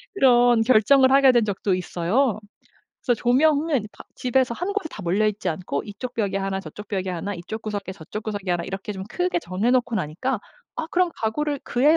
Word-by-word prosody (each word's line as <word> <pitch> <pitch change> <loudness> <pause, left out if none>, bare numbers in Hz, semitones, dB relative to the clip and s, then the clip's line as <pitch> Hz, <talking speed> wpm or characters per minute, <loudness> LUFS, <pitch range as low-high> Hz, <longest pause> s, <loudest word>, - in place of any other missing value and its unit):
그런 245 - +5
결정을 260 +3 +5
하게 270 -1 +7
된 240 -3 +3
적도 200 -1 0
있어요. 195 +6 0 0.7
그래서 245 -3 +2
조명은 280 -1 +2
바 - - -13
집에서 255 -1 +1
1 360 +9 -3
곳에 405 -6 -2
다 210 - -8
몰려 190 +5 +1
있지 210 -1 -1
않고 155 -3 -3
이 205 - -9
쪽 250 -1 -5
벽에 200 -4 -1
1 195 0 -2
저 - - -9
쪽 210 - -10
벽에 190 -2 -2
1 180 +3 -4
이 170 - -7
쪽 220 - -4
구석에 205 -3 -4
저 180 -4 -13
쪽 215 - -4
구석에 205 -3 -5
1 175 -1 -1
이렇게 195 +3 -5
좀 190 -1 -6
크게 360 -1 0
정해 200 - -1
놓고 245 -2 +1
나니까 190 - -2 0.4
'아 320 - -3
그럼 360 -1 +2
가구를 285 +6 -1
그에 290 +6 +3
220 Hz, 355 characters per minute, -23 LUFS, 195-265 Hz, 0.7 s, 하게